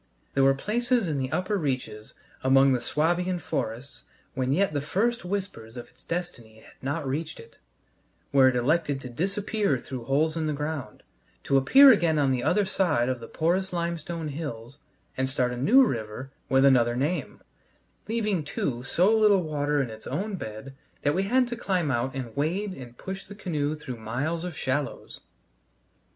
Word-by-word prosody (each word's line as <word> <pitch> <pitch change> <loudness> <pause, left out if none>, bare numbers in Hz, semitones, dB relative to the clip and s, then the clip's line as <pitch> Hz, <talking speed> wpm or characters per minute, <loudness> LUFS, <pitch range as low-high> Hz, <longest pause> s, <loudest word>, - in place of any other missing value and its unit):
There 135 - +3
were 135 0 +5
places 235 - 0
in 150 -3 -1
the 130 0 -3
upper 185 +3 0
reaches 125 -8 -4 0.3
among 135 +1 +5
the 125 -2 +1
Swabian 175 +7 0
forests, 125 -4 -4 0.3
when 130 -1 -1
yet 185 +3 +2
the 145 - 0
first 220 +10 0
whispers 180 - -5
of 120 - -8
its - - -24
destiny 120 -11 -5
had - - -17
not 140 +2 -3
reached 155 +4 -3
it, - - -15 0.7
where 135 -2 +6
it 130 - +2
elected 145 +3 +1
to 125 - -7
disappear 195 - 0
through 125 -1 -7
holes 155 +5 +1
in 160 -1 -1
the 150 - 0
ground, 145 -6 -5 0.4
to 140 - +1
appear 265 - +8
again 170 -8 +3
on 140 -2 +3
the 125 -2 0
other 205 -1 +2
side 160 -10 +1
of 130 -1 -2
the 115 - -9
porous 185 +4 0
limestone 170 -2 -3
hills 140 -4 -6 0.4
and 130 0 0
start 125 -2 0
a - - -4
new 215 - +5
river 115 - -4 0.2
with 135 +1 +4
another 120 -3 +4
name; 145 +8 -2 0.7
leaving, 215 -6 0
too, 135 -4 -3
so 180 - +2
little 210 -4 +4
water 145 -2 0
in 120 - -6
its 110 0 -10
own 205 +1 -2
bed 110 - -7 0.3
that 145 - +2
we 185 - +1
had 255 +1 +3
to 240 - -4
climb 185 -9 0
out 130 +2 -1
and 125 -4 -5
wade 180 +8 -1
and 125 -6 -11
push 190 0 -6
the 205 - -11
canoe 155 -6 -2
through 130 -5 -7
miles 130 +10 -3
of 180 -4 -6
shallows! 135 +1 -3
145 Hz, 180 wpm, -26 LUFS, 130-180 Hz, 0.7 s, appear